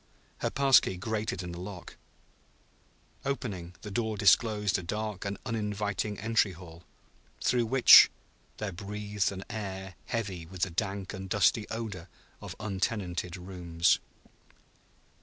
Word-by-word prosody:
Her -, -, 0 dB
pass 135 Hz, -2 st, +6 dB
key 95 Hz, -, -4 dB
grated 110 Hz, 0 st, -3 dB
in 90 Hz, -, -6 dB
the 85 Hz, -, -7 dB
lock. 90 Hz, -1 st, -8 dB, 1.3 s
Opening, 100 Hz, -11 st, -4 dB
the 105 Hz, -, -7 dB
door 110 Hz, 0 st, -1 dB
disclosed 105 Hz, -1 st, +3 dB
a -, -, -5 dB
dark 105 Hz, +2 st, -4 dB
and 100 Hz, 0 st, -3 dB
uninviting 105 Hz, -2 st, -2 dB
entry 110 Hz, -3 st, +1 dB
hall, 85 Hz, -1 st, -12 dB, 0.6 s
through 120 Hz, -2 st, +1 dB
which 130 Hz, +2 st, +9 dB, 0.5 s
there 105 Hz, -2 st, -3 dB
breathed 105 Hz, +2 st, -2 dB
an 95 Hz, 0 st, -6 dB
air 95 Hz, -4 st, -5 dB
heavy 95 Hz, -8 st, -3 dB
with 90 Hz, 0 st, -4 dB
the 90 Hz, -, -1 dB
dank 95 Hz, +1 st, -3 dB
and 95 Hz, 0 st, -7 dB
dusty 105 Hz, +2 st, +3 dB
odor 110 Hz, -6 st, -5 dB, 0.3 s
of -, -, -7 dB
untenanted 95 Hz, -4 st, -2 dB
rooms. 90 Hz, -2 st, +1 dB
100 Hz, 130 wpm, -29 LUFS, 90-110 Hz, 1.3 s, which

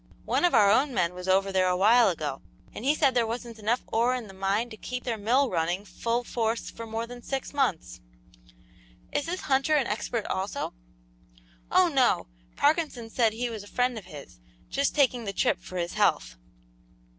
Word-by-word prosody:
One -, -, +2 dB
of 345 Hz, -, +3 dB
our 205 Hz, -3 st, +6 dB
own 260 Hz, +4 st, +2 dB
men 170 Hz, 0 st, +1 dB
was 180 Hz, +1 st, -8 dB
over 195 Hz, +1 st, +3 dB
there 185 Hz, -1 st, +2 dB
a 180 Hz, 0 st, +1 dB
while 225 Hz, +4 st, +5 dB
ago, 150 Hz, -6 st, -4 dB, 0.3 s
and -, -, -7 dB
he 285 Hz, +3 st, +3 dB
said 280 Hz, -4 st, +3 dB
there 240 Hz, -2 st, +2 dB
wasn't 230 Hz, 0 st, -6 dB
enough 225 Hz, +4 st, 0 dB
ore 240 Hz, +3 st, +1 dB
in 245 Hz, -3 st, -5 dB
the 195 Hz, -, -12 dB
mine 195 Hz, +5 st, -1 dB
to -, -, -7 dB
keep 250 Hz, +3 st, -5 dB
their 240 Hz, -2 st, -2 dB
mill 240 Hz, +6 st, +2 dB
running 175 Hz, +3 st, -1 dB
full 230 Hz, +6 st, -2 dB
force 230 Hz, -1 st, -2 dB
for 230 Hz, 0 st, -8 dB
more 225 Hz, +1 st, -3 dB
than 245 Hz, +1 st, -10 dB
six 270 Hz, +3 st, -4 dB
months." 250 Hz, -, -1 dB, 1.1 s
"Is 290 Hz, +1 st, -1 dB
this 360 Hz, +2 st, -3 dB
Hunter 275 Hz, +2 st, +2 dB
an 280 Hz, -4 st, +2 dB
expert 220 Hz, +1 st, -2 dB
also?" 190 Hz, +2 st, -3 dB, 1.0 s
"Oh, 370 Hz, -1 st, +5 dB
no; 270 Hz, -6 st, +2 dB, 0.3 s
Parkinson 290 Hz, -7 st, 0 dB
said 225 Hz, -3 st, +2 dB
he 240 Hz, +2 st, -3 dB
was 220 Hz, -2 st, -6 dB
a -, -, -13 dB
friend 250 Hz, +3 st, 0 dB
of 215 Hz, -4 st, -8 dB
his, 150 Hz, -, -12 dB, 0.3 s
just 280 Hz, 0 st, 0 dB
taking 255 Hz, -5 st, +2 dB
the 200 Hz, -, -3 dB
trip -, -, +1 dB
for 185 Hz, -, -8 dB
his 175 Hz, -1 st, -2 dB
health." -, -, +1 dB
230 Hz, 195 wpm, -27 LUFS, 195-255 Hz, 1.1 s, our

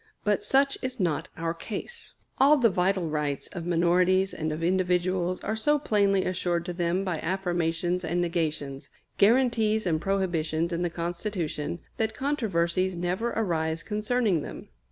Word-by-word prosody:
But 210 Hz, -1 st, +1 dB
such 275 Hz, +1 st, +2 dB
is 255 Hz, -1 st, -3 dB
not 170 Hz, -6 st, 0 dB
our 165 Hz, 0 st, -1 dB
case. 225 Hz, -, -6 dB, 0.2 s
All 285 Hz, +3 st, +6 dB
the 235 Hz, -5 st, +4 dB
vital 185 Hz, -1 st, +1 dB
rights 150 Hz, -2 st, -2 dB
of 175 Hz, -3 st, -6 dB
minorities 180 Hz, +2 st, +3 dB
and 155 Hz, 0 st, -2 dB
of 155 Hz, +2 st, -4 dB
individuals 180 Hz, 0 st, +1 dB
are 215 Hz, -, -1 dB
so 295 Hz, +7 st, +3 dB
plainly 200 Hz, -7 st, +2 dB
assured 175 Hz, -2 st, -1 dB
to 180 Hz, -, -4 dB
them 175 Hz, +2 st, 0 dB
by 180 Hz, -5 st, -2 dB
affirmations 175 Hz, -1 st, -1 dB
and 175 Hz, +1 st, -1 dB
negations, 155 Hz, -5 st, -2 dB, 0.3 s
guarantees 220 Hz, -1 st, +3 dB
and 160 Hz, -3 st, +1 dB
prohibitions 170 Hz, -4 st, 0 dB
in 170 Hz, -, -1 dB
the 175 Hz, -, 0 dB
Constitution, 170 Hz, -2 st, -3 dB, 0.2 s
that 220 Hz, 0 st, -1 dB
controversies 190 Hz, -, 0 dB
never 180 Hz, +7 st, -1 dB
arise 165 Hz, -6 st, -1 dB
concerning 210 Hz, -4 st, 0 dB
them. -, -, -8 dB
180 Hz, 150 wpm, -27 LUFS, 170-210 Hz, 0.3 s, All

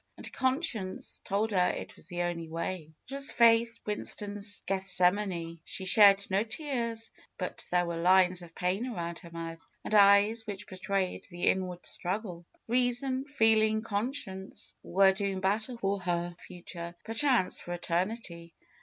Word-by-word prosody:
And -, -, -7 dB
conscience 260 Hz, -, -2 dB
told 210 Hz, +3 st, 0 dB
her 180 Hz, -3 st, +3 dB
it -, -, -5 dB
was -, -, -11 dB
the 175 Hz, 0 st, -2 dB
only 170 Hz, -2 st, -3 dB
way. 165 Hz, 0 st, -4 dB, 0.2 s
It 270 Hz, -, -8 dB
was 275 Hz, 0 st, +1 dB
Faith 230 Hz, 0 st, +4 dB
Winston's 205 Hz, 0 st, -3 dB
Gethsemane. 180 Hz, -2 st, 0 dB
She 190 Hz, -, -4 dB
shed 200 Hz, 0 st, +7 dB
no 195 Hz, +1 st, +3 dB
tears, 235 Hz, -2 st, -3 dB, 0.3 s
hut -, -, -2 dB
there 175 Hz, 0 st, +2 dB
were 170 Hz, -1 st, -3 dB
lines 180 Hz, +1 st, +4 dB
of 170 Hz, -1 st, -13 dB
pain 190 Hz, +7 st, -1 dB
around 170 Hz, -7 st, -4 dB
her 170 Hz, -, -12 dB
mouth 165 Hz, 0 st, -6 dB, 0.3 s
and -, -, -4 dB
eyes 205 Hz, +2 st, +6 dB
which 205 Hz, -1 st, -5 dB
betrayed 190 Hz, -1 st, -2 dB
the 175 Hz, -1 st, -8 dB
inward 180 Hz, -2 st, 0 dB
struggle. 180 Hz, -2 st, -4 dB, 0.2 s
Reason, 255 Hz, +2 st, +1 dB
feeling, 220 Hz, -5 st, +3 dB
conscience, 205 Hz, -3 st, -4 dB
were 190 Hz, +2 st, +4 dB
doing 195 Hz, -1 st, -2 dB
battle 215 Hz, +6 st, 0 dB
for 200 Hz, -2 st, -1 dB
her 175 Hz, -1 st, -2 dB
future; 170 Hz, -1 st, -8 dB
perchance 230 Hz, -3 st, +2 dB
for 175 Hz, -, -8 dB
eternity. 175 Hz, 0 st, -3 dB
195 Hz, 145 wpm, -30 LUFS, 175-225 Hz, 0.3 s, shed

